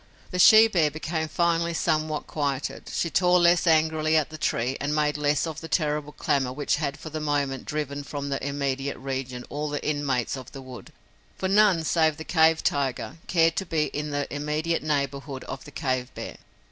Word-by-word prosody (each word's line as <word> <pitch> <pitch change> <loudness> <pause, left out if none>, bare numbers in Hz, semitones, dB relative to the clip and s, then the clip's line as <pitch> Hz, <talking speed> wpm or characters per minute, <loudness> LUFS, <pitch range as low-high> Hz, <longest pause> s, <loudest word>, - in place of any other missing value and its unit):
The 180 - -3
she 220 +4 +9
bear 170 -8 +2
became 160 +1 -3
finally 170 +1 +1
somewhat 155 -2 0
quieted; 140 -3 -3
she 170 - -1
tore 180 0 +4
less 175 +1 +4
angrily 160 -1 +3
at 155 -1 0
the 155 - -7
tree 125 -2 0
and 145 +2 -1
made 150 -1 +1
less 145 0 +1
of 155 -1 -6
the 165 - -7
terrible 150 -3 -1
clamor 135 -3 0
which 145 +2 0
had 145 -1 -2
for 155 +1 -9
the 155 - -3
moment 145 -3 -1
driven 145 -1 -3
from 140 0 -5
the 135 - -3
immediate 140 -1 -2
region 130 -2 -5
all 150 +1 -3
the 145 0 -3
inmates 140 -5 0
of 130 -3 -10
the 135 - -8
wood, 130 -1 -11 0.5
for 190 - -1
none 195 -4 +4
save 160 -1 +2
the 160 - -6
cave 160 -1 +3
tiger 135 -2 -1
cared 165 -2 +3
to 190 - -1
be 155 -3 +1
in 150 +1 -3
the 145 -1 -1
immediate 150 +3 -1
neighborhood 140 -2 -2
of 130 - -7
the 145 - -11
cave 130 -4 -2
bear. - - -7
150 Hz, 195 wpm, -26 LUFS, 140-160 Hz, 0.5 s, she